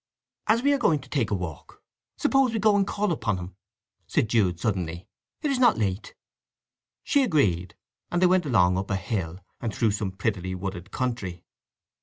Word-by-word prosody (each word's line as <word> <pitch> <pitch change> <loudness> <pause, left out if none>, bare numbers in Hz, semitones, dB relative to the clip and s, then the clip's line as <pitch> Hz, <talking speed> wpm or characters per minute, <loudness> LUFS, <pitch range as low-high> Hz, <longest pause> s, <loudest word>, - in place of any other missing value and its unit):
"As 225 +3 +3
we 285 +1 +4
are 280 - +1
going 165 -10 +3
to - - -15
take 130 -7 0
a 105 - +1
walk, 85 -5 -7 0.3
suppose 270 -3 +3
we - - 0
go 210 0 +4
and 200 -1 +2
call 205 -1 0
upon 115 - -1
him?" 90 0 -8 0.5
said 110 - +1
Jude 95 -7 +2
suddenly. 90 -3 -2 0.4
"It 295 - +1
is 265 - 0
not 240 -3 +5
late." 100 -1 -2 0.9
She 285 - +3
agreed, 105 - +1 0.3
and 175 - 0
they 185 - +5
went 180 -3 +3
along 90 -7 +3
up 100 - -4
a 100 - +1
hill, 95 -3 -3 0.2
and 115 - -2
through 110 +1 +1
some 100 -1 -2
prettily 95 -2 -2
wooded 95 0 -5
country. 105 -8 -3
110 Hz, 185 wpm, -26 LUFS, -, 0.9 s, not